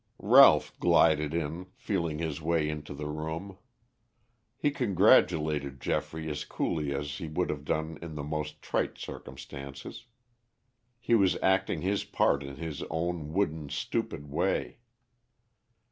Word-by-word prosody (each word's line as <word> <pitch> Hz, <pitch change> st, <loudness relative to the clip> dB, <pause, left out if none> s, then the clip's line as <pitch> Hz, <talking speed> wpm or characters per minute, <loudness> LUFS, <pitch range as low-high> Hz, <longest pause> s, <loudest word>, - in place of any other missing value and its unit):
Ralph -, -, +7 dB
glided 75 Hz, -1 st, +4 dB
in, 85 Hz, +2 st, -3 dB
feeling 95 Hz, -11 st, -2 dB
his 80 Hz, -2 st, -3 dB
way 80 Hz, -1 st, +1 dB
into 75 Hz, -1 st, -5 dB
the 75 Hz, +1 st, -6 dB
room. 80 Hz, +6 st, -5 dB, 1.0 s
He 145 Hz, -, +1 dB
congratulated 85 Hz, -, +3 dB
Geoffrey 80 Hz, +4 st, -2 dB
as 75 Hz, 0 st, -3 dB
coolly 75 Hz, -1 st, -2 dB
as 70 Hz, 0 st, -3 dB
he 80 Hz, -, -5 dB
would 85 Hz, +3 st, -1 dB
have 70 Hz, -1 st, -5 dB
done 80 Hz, +1 st, -2 dB
in 80 Hz, -2 st, -7 dB
the 75 Hz, -, -4 dB
most 75 Hz, 0 st, -4 dB
trite -, -, -1 dB
circumstances. 70 Hz, -, -9 dB, 0.9 s
He 120 Hz, -, 0 dB
was 100 Hz, -5 st, +4 dB
acting 95 Hz, 0 st, +2 dB
his 100 Hz, +2 st, 0 dB
part 70 Hz, -, +1 dB
in 70 Hz, -1 st, -7 dB
his 80 Hz, 0 st, -5 dB
own 80 Hz, -1 st, -2 dB
wooden, 80 Hz, -6 st, -1 dB
stupid 75 Hz, 0 st, -3 dB
way. 70 Hz, -, -1 dB
80 Hz, 130 wpm, -29 LUFS, 75-85 Hz, 1.0 s, Ralph